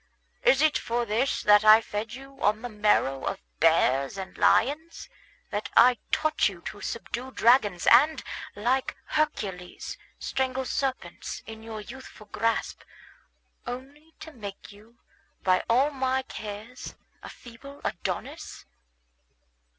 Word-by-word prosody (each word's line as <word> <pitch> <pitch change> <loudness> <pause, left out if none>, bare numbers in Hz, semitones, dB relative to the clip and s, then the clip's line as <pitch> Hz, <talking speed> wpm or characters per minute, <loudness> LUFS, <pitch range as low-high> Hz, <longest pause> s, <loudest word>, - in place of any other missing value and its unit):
Is - - +4
it 310 -1 +3
for 235 +1 -1
this 235 +5 0
that 210 0 +6
I 215 +1 +9
fed 220 +1 -5
you 270 +1 -13
on 215 +3 +1
the 245 - -4
marrow 210 - +1
of - - -2 0.2
bears 145 -1 +3
and 190 -1 -7
lions, 305 +7 +1 0.4
that 205 +1 -3
I 250 0 +7
taught 310 -7 +2
you 180 -4 -11
to 205 +3 -8
subdue 240 +2 -5
dragons, 230 -7 +3
and, 295 +7 +5 0.3
like 250 +7 0
Hercules, 200 -13 -3 0.2
strangle 265 0 -2
serpents 265 0 -3
in 220 0 -9
your 220 -1 -7
youthful 235 -1 -11
grasp, 225 +2 -1 0.9
only 280 +6 -8
to 320 - -9
make 205 -5 -9
you, 215 +4 -18 0.5
by 185 -1 +3
all 260 +6 +4
my 265 -1 0
cares, 220 +1 -8 0.3
a - - -9
feeble 265 +4 -12
Adonis? 170 - -5
235 Hz, 125 wpm, -27 LUFS, 210-265 Hz, 0.9 s, I